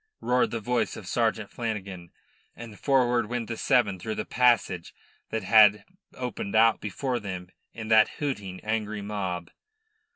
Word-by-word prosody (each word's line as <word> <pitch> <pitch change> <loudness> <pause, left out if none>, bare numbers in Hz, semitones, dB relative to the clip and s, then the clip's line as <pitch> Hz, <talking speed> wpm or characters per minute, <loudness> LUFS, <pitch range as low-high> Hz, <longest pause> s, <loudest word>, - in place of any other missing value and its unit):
roared 125 0 +2
the 115 - -3
voice 120 +3 -1
of 105 - -9
Sergeant 110 0 0
Flanagan, 100 -7 -5 0.5
and 115 -3 -10
forward 125 -4 +2
went 120 -1 -3
the 115 - -4
seven 110 -7 +2
through 110 +4 -4
the - - -3
passage 120 -8 +1 0.3
that 110 -2 -3
had 105 +1 +6 0.3
opened 120 -5 -4
out 115 +1 +4
before 120 +5 -2
them 95 -4 -6 0.2
in 110 -1 -8
that 110 -1 +6
hooting, 105 -11 -4
angry 110 -1 -2
mob. 95 -4 -4
110 Hz, 150 wpm, -27 LUFS, 100-120 Hz, 0.5 s, had